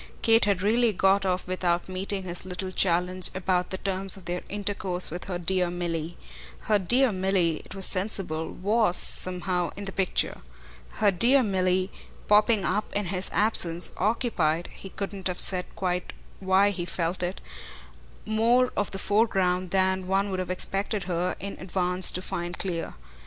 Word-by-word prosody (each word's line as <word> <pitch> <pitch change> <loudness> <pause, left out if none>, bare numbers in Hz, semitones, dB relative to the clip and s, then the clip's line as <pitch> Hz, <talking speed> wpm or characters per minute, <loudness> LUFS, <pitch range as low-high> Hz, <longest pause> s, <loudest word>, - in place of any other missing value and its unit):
Kate 225 -1 +4
had 195 -2 0
really 230 +2 +3
got 195 0 +2
off 180 -1 -1
without 175 -1 -1
meeting 190 +1 -2
his 175 -1 -3
little 185 0 -5
challenge 180 0 +1
about 185 -1 0
the 190 - -4
terms 195 0 +3
of 190 - -13
their 175 +1 -3
intercourse 195 -4 -2
with 175 +2 -6
her 180 -2 -4
dear 180 +1 0
Milly. 170 -1 -4 0.4
Her 210 -1 +1
dear 245 +7 +2
Milly, 185 -4 0
it - - -12
was 195 -1 +1
sensible, 185 -5 0
WAS 205 -1 +1
somehow 180 -1 +2
in 200 - -6
the 195 - -5
picture. 190 -1 -1 0.5
Her 205 - +2
dear 250 +8 +3
Milly, 185 -2 0 0.4
popping 210 0 +3
up 210 +1 -1
in 205 0 0
his 185 0 +2
absence, 180 -4 +4
occupied 180 -7 0
he 195 - -10
couldn't 195 -1 -5
have 180 -1 -4
said 180 -2 +2
quite 180 -1 -3 0.3
why 195 +1 +3
he 180 -3 -4
felt 170 +1 -2
it 180 +2 -3 0.9
more 235 +4 +2
of 205 - -1
the 195 - -6
foreground 190 -3 +1
than 190 0 0
one 195 +1 0
would 185 - -2
have 185 -1 -4
expected 195 +2 -1
her 180 0 -2
in 200 +2 -6
advance 180 0 +1
to 185 - -2
find 175 0 -5
clear. 175 -4 -2
185 Hz, 165 wpm, -26 LUFS, 180-200 Hz, 0.9 s, Kate